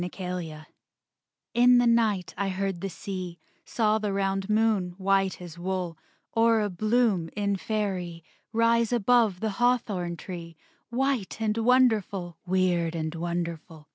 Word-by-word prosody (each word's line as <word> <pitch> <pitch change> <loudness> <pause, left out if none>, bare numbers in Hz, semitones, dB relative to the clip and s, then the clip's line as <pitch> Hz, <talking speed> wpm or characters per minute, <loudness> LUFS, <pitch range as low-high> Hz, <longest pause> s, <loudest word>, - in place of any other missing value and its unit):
THE 180 - -2
CHANGELING 180 -5 -6 0.9
In 245 +1 +6
the 245 - +4
night 225 -5 +2
I 195 +1 -1
heard 190 -2 -2
the 195 - -3
sea; 185 -2 -6 0.3
Saw 215 -2 +1
the 210 -2 -2
round 195 0 -1
moon, 210 -5 +1
white 195 0 +1
as 175 -2 -10
wool, 180 -2 -3 0.4
Or 225 -1 +3
a 205 -1 -1
bloom 215 -3 +1
in 200 -1 0
Faerie, 185 -5 -3 0.3
Rise 230 0 +2
above 230 -4 +3
the 220 -1 0
hawthorn 205 -8 +1
tree, 170 -2 -8 0.3
White 250 -4 -1
and 215 -1 0
wonderful, 215 -8 +2
Weird 175 -2 +1
and 160 -1 -3
wonderful. 165 -2 -5
195 Hz, 140 wpm, -27 LUFS, 175-220 Hz, 0.9 s, In